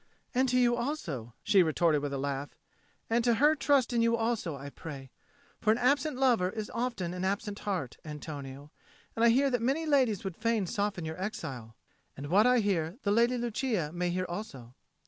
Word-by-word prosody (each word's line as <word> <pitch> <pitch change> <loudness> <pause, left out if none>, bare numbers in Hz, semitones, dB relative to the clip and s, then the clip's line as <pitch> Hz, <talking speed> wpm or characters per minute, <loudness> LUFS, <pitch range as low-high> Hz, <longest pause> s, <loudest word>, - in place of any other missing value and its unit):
"And 260 +1 +2
to 250 - +2
you 240 -1 +4
also," 180 - -4
she 195 - +5
retorted 160 -2 +2
with 145 -1 -3
a 140 - -2
laugh. 140 +1 -3 0.5
"And 235 +1 +1
to 240 -1 +3
her 295 +5 +4
trust 275 -3 +2
in 235 - +2
you 230 0 +3
also, 225 -8 -1
I 140 +1 -8
pray. 135 -5 -9 0.5
For 215 - +3
an 225 - +2
absent 280 +3 +1
lover 240 -9 +3
is 215 +1 -5
often 230 -8 -2
an 180 0 -4
absent 200 +1 -2
heart, 180 -11 -3
Antonio, 145 -2 -8 0.4
and 225 - 0
I 235 - +7
hear 270 +4 +3
that 245 -2 0
many 275 +7 0
ladies 260 - +2
would 190 -4 -4
fain 220 -1 0
soften 200 -3 -2
your 160 +3 -5
exile. 125 - -5 0.4
And 145 +2 -6
what 210 +6 +5
I 250 -1 +4
hear, 180 -3 -1
the 200 - +1
Lady 235 +3 +3
Lucia 235 - -1
may 175 0 -1
hear 185 +1 -1
also." 155 - -7
205 Hz, 195 wpm, -30 LUFS, 160-240 Hz, 0.5 s, I